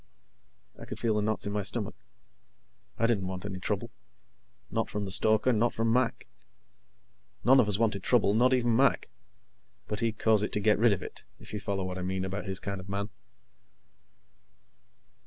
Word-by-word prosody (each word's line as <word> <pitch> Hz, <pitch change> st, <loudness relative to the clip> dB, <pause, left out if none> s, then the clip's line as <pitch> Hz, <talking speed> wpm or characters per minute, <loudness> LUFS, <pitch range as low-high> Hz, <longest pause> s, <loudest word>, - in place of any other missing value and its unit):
I -, -, -8 dB
could -, -, -7 dB
feel 115 Hz, -2 st, +1 dB
the 105 Hz, -, +1 dB
knots 110 Hz, +1 st, -1 dB
in 100 Hz, -, -3 dB
my 105 Hz, -, 0 dB
stomach. 105 Hz, +1 st, -3 dB, 1.0 s
I 115 Hz, -, +2 dB
didn't 105 Hz, -6 st, +1 dB
want 95 Hz, +1 st, -5 dB
any 95 Hz, -3 st, -5 dB
trouble. -, -, -2 dB, 0.8 s
Not -, -, -1 dB
from 105 Hz, -1 st, -3 dB
the 95 Hz, -, -4 dB
stoker, 110 Hz, +5 st, +3 dB
not 115 Hz, +2 st, +1 dB
from 115 Hz, 0 st, +1 dB
Mac. 125 Hz, -1 st, +1 dB, 1.2 s
None 130 Hz, +2 st, +6 dB
of 115 Hz, -, +4 dB
us 100 Hz, -, +2 dB
wanted 110 Hz, -3 st, +1 dB
trouble 105 Hz, -3 st, +3 dB
not 125 Hz, +4 st, +4 dB
even 120 Hz, -3 st, +2 dB
Mac, 135 Hz, +3 st, +2 dB, 0.8 s
but 105 Hz, -, -3 dB
he'd 115 Hz, -1 st, -1 dB
cause 110 Hz, -2 st, +3 dB
it 105 Hz, -, -1 dB
to -, -, +1 dB
get 105 Hz, +1 st, +3 dB
rid 115 Hz, 0 st, +5 dB
of 100 Hz, -, -1 dB
it, -, -, -8 dB, 0.2 s
if -, -, -11 dB
you 105 Hz, -, -2 dB
follow 100 Hz, -1 st, -2 dB
what 90 Hz, 0 st, -4 dB
I -, -, -4 dB
mean 95 Hz, +1 st, -2 dB
about 95 Hz, +2 st, -4 dB
his 95 Hz, -1 st, -1 dB
kind 100 Hz, -1 st, -4 dB
of 95 Hz, -, -13 dB
man. 100 Hz, +2 st, -3 dB
105 Hz, 190 wpm, -29 LUFS, 100-115 Hz, 1.2 s, None